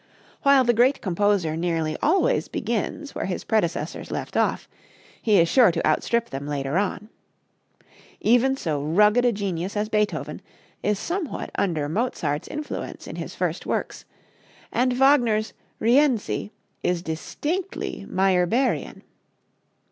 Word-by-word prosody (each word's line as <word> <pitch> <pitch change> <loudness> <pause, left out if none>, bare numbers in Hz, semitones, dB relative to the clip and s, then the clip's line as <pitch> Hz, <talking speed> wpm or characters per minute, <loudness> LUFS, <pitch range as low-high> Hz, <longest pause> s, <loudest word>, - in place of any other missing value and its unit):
While 275 -2 +5
the 240 -1 +3
great 250 +5 +3
composer 190 -3 +1
nearly 165 -2 -1
always 385 +10 +2
begins 235 +6 -3
where - - -3
his 185 - -3
predecessors 170 -7 -1
left - - -5
off, - - +1 0.5
he 210 -4 +4
is 170 - +4
sure 240 -1 +5
to 165 - -2
outstrip 235 +9 +1
them 140 +1 -5
later 140 0 -2
on. 205 +1 -3 1.1
Even 245 +4 +3
so 155 - -2
rugged 210 +10 +4
a 245 - +4
genius 195 -2 -3
as 210 +1 -1
Beethoven 210 -1 -1 0.4
is 210 -1 +1
somewhat 340 - -4
under 160 -7 0
Mozart's 160 - -2
influence 300 0 -6
in - - -8
his - - -6
first - - -2
works, - - -3 0.7
and 255 +1 +2
Wagner's 245 -5 +3 0.3
"Rienzi" 245 -3 +2 0.3
is 180 -1 0
distinctly 305 - -4
Meyerbeerian. 190 +7 +1
210 Hz, 125 wpm, -24 LUFS, 170-250 Hz, 1.1 s, While